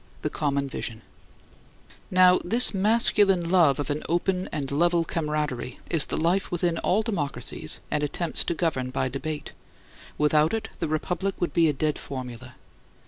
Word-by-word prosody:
THE - - -2
COMMON 140 -2 -1
VISION 115 -4 -5 1.1
Now 185 0 +5
this 235 +7 +5
masculine 195 -3 +4
love 165 -7 +4
of 145 0 -3
an 145 - -3
open 180 +2 -1
and 140 -3 -4
level 170 +3 +2
camaraderie 150 -7 -3
is 160 -4 +5
the - - -3
life 175 +4 0
within 175 -1 -1
all 210 +4 +1
democracies 175 -11 -2
and 150 - 0
attempts 160 +3 -1
to 170 - -2
govern 150 -7 -1
by 130 0 -2
debate; 150 +3 -6 0.6
without 150 +4 +2
it 220 0 -5
the 165 - -2
republic 180 +5 -2
would 175 - -2
be 165 -2 +3
a - - 0
dead 150 +2 -2
formula. 130 -1 -8
160 Hz, 155 wpm, -25 LUFS, 145-180 Hz, 1.1 s, Now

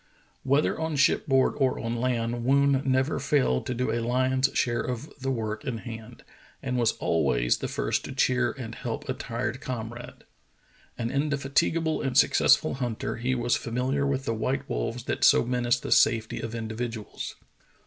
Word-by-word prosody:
" - - -38
Whether 145 +3 +2
on 160 -1 -2
shipboard 135 -1 +3
or 135 -2 +1
on 115 +1 -3
land, 120 -1 -1
Woon 140 +1 +3
never 130 +2 +1
failed 130 - +1
to 125 - -2
do 125 -1 -1
a 115 - 0
lion's 130 +2 +2
share 120 -1 +1
of 125 +3 -4
the 135 0 -2
work 110 -4 -3
in 125 -4 -3
hand, 110 +1 -9 0.4
and 130 -2 -2
was 120 -3 +1
al 80 - +2
ways - - +2
the - - -3
first - - -1
to - - -6
cheer 125 -2 +2
and 120 -4 -7
help 115 -2 -5
a 130 - 0
tired 125 +1 -4
comrade. 120 -1 -6 0.7
An 115 0 -2
indefatigable 145 +3 0
and 135 -2 -1
successful - - +4
hunter, 120 -5 -3
he 125 +2 0
was 120 0 +1
familiar 130 +4 -1
with 135 -1 -1
the 115 - 0
white 130 +5 -2
wolves 115 +1 -3
that - - -3
so - - +6
menaced 120 0 0
the - - -5
safety 115 -1 +3
of 115 0 -5
individuals. 115 -1 -5
125 Hz, 175 wpm, -27 LUFS, 115-135 Hz, 0.7 s, so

